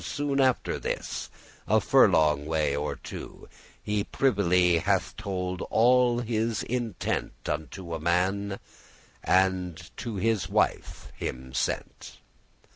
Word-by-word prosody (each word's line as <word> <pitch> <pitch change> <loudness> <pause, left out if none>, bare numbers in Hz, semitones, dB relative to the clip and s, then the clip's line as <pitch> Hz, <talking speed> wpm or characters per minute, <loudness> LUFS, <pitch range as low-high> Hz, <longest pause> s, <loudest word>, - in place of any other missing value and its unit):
Soon 145 -1 -1
after 130 -2 +1
this, - - -4 0.4
a - - +4
furlong 75 -2 +4
way 75 -3 +1
or 75 +1 -2
two,<8> - - -9 0.4
He 105 -1 0
privily 90 -9 +2
hath - - 0
told 95 -4 -3
all 120 +1 +4
his 115 -1 -1
intent 120 -5 -3
Unto 85 +3 -4
a 80 - -3
man, 95 +4 0 0.6
and 90 -3 +1
to 115 -3 -5
his 110 0 0
wife - - -1
him 65 0 -5
sent. - - -3
95 Hz, 115 wpm, -27 LUFS, 85-115 Hz, 0.6 s, a